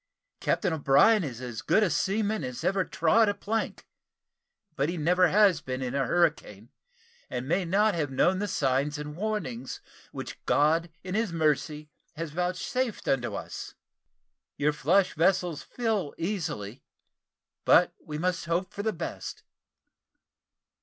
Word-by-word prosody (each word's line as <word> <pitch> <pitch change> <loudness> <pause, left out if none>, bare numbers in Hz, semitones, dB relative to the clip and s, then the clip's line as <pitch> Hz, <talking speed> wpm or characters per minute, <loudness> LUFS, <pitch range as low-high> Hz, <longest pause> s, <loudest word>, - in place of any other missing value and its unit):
Captain 175 - 0
O'Brien 160 +8 +4
is 130 -5 -5
as 120 -3 -5
good 220 - +3
a 200 - +2
seaman 210 -1 0
as 125 +3 -5
ever 190 +2 +2
trod 205 +7 +3
a 205 - -1
plank; 220 +2 -3 0.9
but 145 -1 0
he 175 - -3
never 180 +4 +4
has 190 -4 +4
been 130 -2 -4
in 125 0 -3
a 135 -2 0
hurricane, 150 - 0 0.6
and 125 +1 -4
may 180 +4 +1
not 205 +5 +3
have 155 -4 -1
known 180 +8 +2
the 205 - -1
signs 140 -1 0
and 150 0 -6
warnings 170 - -3 0.3
which - - -8
God 160 +3 +3
in 185 -1 -5
His 220 -2 0
Mercy 150 -1 0 0.2
has 165 -1 -5
vouchsafed 185 - -2
unto 125 -3 0
us. - - -7 0.8
Your 150 +1 +2
flush 165 +4 +2
vessels 175 -1 +1
fill 220 -10 -2
easily 155 - -3 0.8
but - - +5
we 150 - -5
must 170 -1 -1
hope 175 +2 -1
for 205 - -4
the 220 +1 0
best." 165 - -6
165 Hz, 145 wpm, -28 LUFS, 145-195 Hz, 0.9 s, but